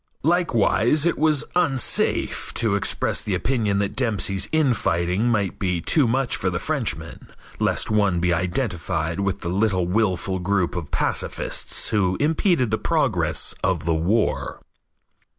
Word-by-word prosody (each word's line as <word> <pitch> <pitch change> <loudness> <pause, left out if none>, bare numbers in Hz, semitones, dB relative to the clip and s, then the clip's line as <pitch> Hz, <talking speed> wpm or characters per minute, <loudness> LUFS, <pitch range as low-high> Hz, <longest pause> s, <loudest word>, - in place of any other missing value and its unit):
Likewise 150 - +2
it 170 - +2
was 150 -1 +2
unsafe 140 -8 0
to 115 -4 +1
express 100 - -1
the 100 - -2
opinion 105 +1 0
that 100 -1 -1
Dempsey's 100 -6 -1
infighting 110 - +1
might 105 -5 -1
be 90 -3 0
too 135 - +3
much 130 +2 0
for - - -1
the - - -2
Frenchman, - - -3 0.3
lest - - 0
one 100 -5 +2
be 90 0 +1
identified 85 -3 -2
with 100 0 -2
the 85 - -3
little 95 -1 +1
willful 95 -1 0
group 95 -1 0
of 80 -4 -5
pacifists - - -1
who 95 -4 +1
impeded 155 - +1
the 110 - 0
progress - - 0
of - - 0
the 85 - +1
war. 95 +8 0
100 Hz, 140 wpm, -23 LUFS, 90-125 Hz, 0.3 s, too